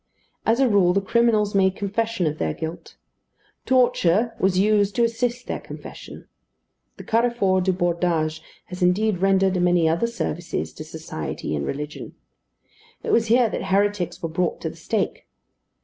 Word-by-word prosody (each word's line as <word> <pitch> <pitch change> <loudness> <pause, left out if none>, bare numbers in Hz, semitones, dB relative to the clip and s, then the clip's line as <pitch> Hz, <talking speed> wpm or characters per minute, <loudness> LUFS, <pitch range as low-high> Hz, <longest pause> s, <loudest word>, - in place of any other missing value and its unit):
As 225 +3 +3
a 270 - +4
rule 195 -5 +4
the 200 - +3
criminals 215 0 +2
made 190 -1 +3
confession 210 0 -1
of 155 0 -2
their 80 -1 -1
guilt. 160 +1 -7 0.7
Torture 235 -4 +3
was 185 -1 +2
used 205 0 +2
to 240 - +3
assist 235 +1 -1
their - - -4
confession. - - -10 0.7
The - - -9
Carrefour 225 -5 +2
du 190 +1 +2
Bordage 170 -3 0 0.2
has 180 +1 -9
indeed 185 +2 +2
rendered 190 -1 +2
many 175 -2 +3
other 170 +8 +1
services 175 -7 -4
to 155 - -8
society 155 - -5
and 70 - -3
religion. 150 +2 -6 0.9
It 465 - -2
was 230 - +3
here 240 +2 +4
that - - -3
heretics 195 -2 0
were 165 - -1
brought 170 +2 -1
to - - -3
the - - -15
stake. - - -3
190 Hz, 155 wpm, -23 LUFS, 175-225 Hz, 0.9 s, a